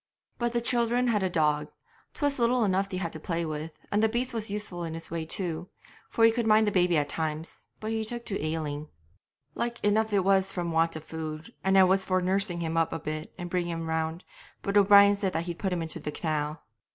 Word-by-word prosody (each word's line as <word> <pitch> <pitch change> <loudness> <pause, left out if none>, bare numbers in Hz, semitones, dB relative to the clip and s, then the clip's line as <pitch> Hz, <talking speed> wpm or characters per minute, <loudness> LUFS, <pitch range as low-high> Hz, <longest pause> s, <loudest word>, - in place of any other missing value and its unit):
But 240 -1 0
the 235 - +1
children 240 +1 +2
had 210 -3 +2
a 190 - +1
dog, 150 -3 +1 0.5
'twas 285 -3 0
little 240 0 +3
enough 195 -1 +1
they 185 - -3
had 170 -3 -3
to 155 - -7
play 170 +1 -2
with, 155 +1 -4 0.2
and 205 - +2
the 220 - +4
beast 245 +2 -1
was 225 -2 -2
useful 200 -4 -4
in 165 -1 -4
his 165 - -8
way 165 -1 -2
too, 175 -1 -3 0.4
for 225 - +4
he 225 - +7
could 230 0 -1
mind 215 0 +5
the 205 - +1
baby 180 -3 +3
at 145 -1 +1
times; 160 +1 -4
but 215 0 -4
he 220 0 -1
took 235 +2 -6
to 195 -6 -3
ailing 155 -1 -3 0.6
like 235 +5 -3
enough 215 +1 +2
it 200 -2 +3
was 195 0 +3
from 175 -3 -3
want 165 0 +2
of 160 - -6
food, 155 0 -6
and 190 0 +3
I 190 - +8
was 190 +1 +3
for 185 -1 +1
nursing 185 -1 0
him 165 0 -2
up 165 -1 +2
a - - -3
bit 155 +1 -5
and 175 -1 -5
bringing 175 -1 -1
him 165 0 -4
round, 160 +1 -2 0.4
but 200 - -2
O'Brien 200 0 +7
said 195 -2 -1
that 165 - 0
he'd 170 -1 -5
put 190 - -1
him 175 -2 -1
into 160 0 -5
the 150 0 -4
canal. 155 -1 -2
180 Hz, 235 wpm, -28 LUFS, 160-210 Hz, 0.6 s, I